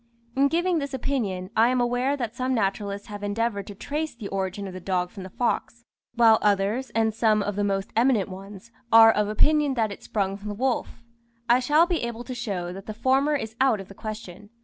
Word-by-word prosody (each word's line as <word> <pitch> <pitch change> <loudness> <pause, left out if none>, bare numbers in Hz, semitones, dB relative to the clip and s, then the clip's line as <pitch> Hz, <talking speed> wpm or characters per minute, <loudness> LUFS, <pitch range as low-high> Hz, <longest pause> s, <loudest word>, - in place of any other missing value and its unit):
In 275 +1 +4
giving 345 +2 +1
this 280 -2 -4
opinion, 205 -9 -2
I 225 +2 +5
am 255 0 +1
aware 245 +3 +1
that 235 -3 -4
some 255 0 -1
naturalists 200 -1 -2
have 205 0 -7
endeavoured 205 0 -2
to 205 - -8
trace 300 +6 -4
the 220 -4 -7
origin 195 +1 -3
of 190 - -8
the 185 - -6
dog 180 -1 -1
from 195 - -9
the 190 - -8
fox; 235 +2 -2 0.3
while 225 -2 +6
others, 210 +5 +1
and 220 -1 +2
some 215 -2 +2
of 205 0 -3
the 205 - 0
most 195 -1 -2
eminent 230 -4 +3
ones, 195 +3 -10 0.2
are 225 0 +9
of 210 -1 0
opinion 295 +5 +3
that 220 -3 0
it - - -9
sprung 195 -2 -2
from 205 +1 -9
the 205 - -4
wolf. 245 0 -2 0.4
I 240 +1 +5
shall 295 +6 +4
be 345 -2 -1
able 235 0 -4
to 255 - -6
show 190 -8 -4
that 195 +1 -10
the 215 - -5
former 270 +5 +2
is 225 -5 -4
out 260 -6 +3
of 195 - -9
the - - -10
question. 210 -2 -8
220 Hz, 220 wpm, -25 LUFS, 200-255 Hz, 0.4 s, are